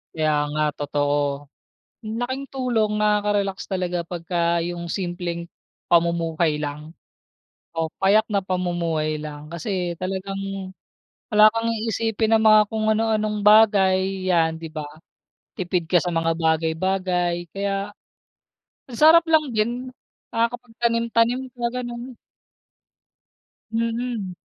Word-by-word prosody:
Kaya 155 Hz, -1 st, +1 dB, 0.2 s
nga 155 Hz, 0 st, +1 dB
totoo. 145 Hz, 0 st, -1 dB, 0.6 s
Ang 220 Hz, +1 st, -4 dB
laking 260 Hz, +3 st, -3 dB
tulong, 240 Hz, -5 st, 0 dB
nakaka-relax 205 Hz, -2 st, +1 dB
talaga 180 Hz, -3 st, -2 dB
pagka 170 Hz, 0 st, -1 dB
'yung 175 Hz, 0 st, -5 dB
simpleng 175 Hz, -2 st, -4 dB, 0.4 s
pamumuhay 170 Hz, -2 st, +2 dB
lang, 150 Hz, +2 st, -6 dB, 0.8 s
o 160 Hz, -1 st, -1 dB
payak 215 Hz, +3 st, +4 dB
na 200 Hz, -2 st, +1 dB
pamumuhay 170 Hz, -4 st, -1 dB
lang. 150 Hz, 0 st, -8 dB
Kasi 175 Hz, +1 st, -3 dB
talagang 195 Hz, +1 st, -4 dB, 0.6 s
wala 215 Hz, 0 st, +7 dB
kang 230 Hz, +1 st, -1 dB
iisipin 225 Hz, 0 st, 0 dB
na 220 Hz, -, +4 dB
mga 215 Hz, -1 st, +7 dB
kung 220 Hz, -1 st, -1 dB
ano-anong 215 Hz, -1 st, 0 dB
bagay, 195 Hz, -3 st, +4 dB
'yan 160 Hz, -2 st, +2 dB
'di 165 Hz, -1 st, -8 dB
ba. 155 Hz, -2 st, -5 dB, 0.7 s
Tipid 180 Hz, -2 st, -2 dB
ka 175 Hz, +2 st, +4 dB
sa 180 Hz, -, -2 dB
mga 165 Hz, -1 st, 0 dB
bagay-bagay 175 Hz, +2 st, 0 dB
kaya, 200 Hz, 0 st, -2 dB, 1.0 s
ang 235 Hz, -, -7 dB
sarap 325 Hz, +2 st, +7 dB
lang 310 Hz, -2 st, +4 dB
din, 240 Hz, +4 st, -1 dB, 0.4 s
nakakapagtanim-tanim 235 Hz, +1 st, 0 dB
ka, 240 Hz, -, -3 dB
ganun. 245 Hz, 0 st, -6 dB, 1.6 s
Mm. 230 Hz, -3 st, -2 dB
190 Hz, 110 wpm, -23 LUFS, 170-220 Hz, 1.6 s, wala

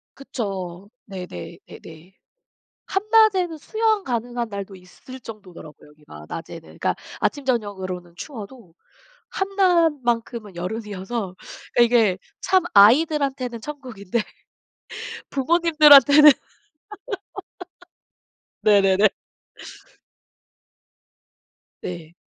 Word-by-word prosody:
그쵸. 195 Hz, -8 st, -6 dB, 0.2 s
네네. 180 Hz, -, -8 dB
네네. 165 Hz, +3 st, -14 dB, 0.7 s
한낮에는 390 Hz, -4 st, +2 dB
수영 435 Hz, +4 st, 0 dB
가능한 240 Hz, -1 st, -3 dB
날도 200 Hz, -1 st, -7 dB
있을 185 Hz, +8 st, -13 dB
정도더라고요 185 Hz, -11 st, -12 dB
여기가 150 Hz, -, -14 dB
낮에는. 165 Hz, 0 st, -7 dB
그러니까 -, -, -3 dB, 0.3 s
아침 285 Hz, -2 st, -1 dB
저녁으로는 190 Hz, -8 st, -3 dB
추워도 225 Hz, -, -10 dB, 0.6 s
한낮만큼은 295 Hz, -, 0 dB
여름이어서 195 Hz, +1 st, -5 dB, 0.4 s
그 240 Hz, -, +6 dB
이게 230 Hz, -6 st, +3 dB, 0.2 s
참 375 Hz, -2 st, +2 dB
아이들한테는 260 Hz, +2 st, +3 dB
천국인데 240 Hz, -7 st, -5 dB, 1.1 s
부모님들한테는 300 Hz, -1 st, +7 dB, 2.3 s
네네네. 200 Hz, -1 st, +4 dB, 2.7 s
네. 170 Hz, -2 st, -8 dB
230 Hz, 215 characters per minute, -22 LUFS, 190-290 Hz, 2.7 s, 부모님들한테는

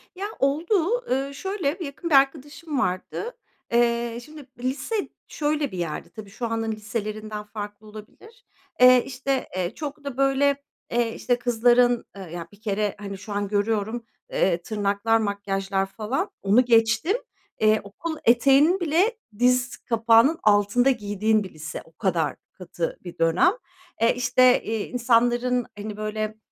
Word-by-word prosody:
Ya, 385 Hz, +2 st, -4 dB
oldu. 345 Hz, -, +1 dB
Iıı, 270 Hz, +2 st, 0 dB
şöyle, 355 Hz, -2 st, -2 dB
yakın 325 Hz, +2 st, -5 dB
bir 300 Hz, -, +4 dB
arkadaşım 285 Hz, +2 st, +1 dB
vardı. 255 Hz, -, -3 dB, 0.4 s
Eee, 235 Hz, 0 st, +1 dB
şimdi, 300 Hz, +1 st, -12 dB
lise 275 Hz, -, -2 dB, 0.2 s
şöyle 295 Hz, -2 st, -1 dB
bir 185 Hz, -, -6 dB
yerdi. 170 Hz, -3 st, -4 dB
Tabii 215 Hz, -2 st, -10 dB
şu 225 Hz, +4 st, -5 dB
anın 225 Hz, 0 st, -2 dB
liselerinden 215 Hz, 0 st, -5 dB
farklı 210 Hz, 0 st, -8 dB
olabilir. 425 Hz, -, -14 dB, 0.4 s
Eee, 250 Hz, -1 st, +8 dB
işte, 265 Hz, 0 st, -2 dB
eee, 180 Hz, -1 st, -2 dB
çok 295 Hz, -1 st, -6 dB
da 280 Hz, -3 st, -6 dB
böyle, 275 Hz, +1 st, +2 dB, 0.3 s
eee, 235 Hz, -1 st, +1 dB
işte, 245 Hz, -1 st, 0 dB
kızların, 245 Hz, 0 st, +3 dB
ııı, 190 Hz, -3 st, -8 dB
ya 170 Hz, -1 st, -6 dB
bir 205 Hz, 0 st, -19 dB
kere, 210 Hz, -1 st, -1 dB
hani, 200 Hz, -1 st, -6 dB
şu 205 Hz, +2 st, -8 dB
an 205 Hz, 0 st, -1 dB
görüyorum, 215 Hz, +3 st, -1 dB, 0.3 s
eee, 175 Hz, -2 st, +1 dB
tırnaklar, 205 Hz, +3 st, +1 dB
makyajlar 195 Hz, -2 st, -1 dB
falan, 230 Hz, -, -3 dB
onu 210 Hz, +6 st, +4 dB
geçtim; 225 Hz, -, +3 dB, 0.4 s
eee, 215 Hz, 0 st, +4 dB
okul 315 Hz, +11 st, -6 dB
eteğinin 275 Hz, +9 st, +5 dB
bile 360 Hz, +8 st, +1 dB, 0.2 s
diz 250 Hz, 0 st, +2 dB
kapağının 230 Hz, +6 st, +3 dB
altında 210 Hz, +5 st, +4 dB
giydiğin 215 Hz, -1 st, 0 dB
bir 190 Hz, -, -10 dB
lise. 155 Hz, -1 st, -7 dB
O -, -, -20 dB
kadar 165 Hz, -2 st, -1 dB, 0.2 s
katı 175 Hz, -2 st, -5 dB
bir 175 Hz, -2 st, -9 dB
dönem. 165 Hz, -, +3 dB, 0.5 s
Eee, 230 Hz, -, +4 dB
işte, 250 Hz, 0 st, +4 dB
iii, 220 Hz, -1 st, -3 dB
insanların, 245 Hz, 0 st, +2 dB
hani, 210 Hz, 0 st, -6 dB
böyle, 215 Hz, 0 st, -3 dB
230 Hz, 145 wpm, -24 LUFS, 205-275 Hz, 0.5 s, Eee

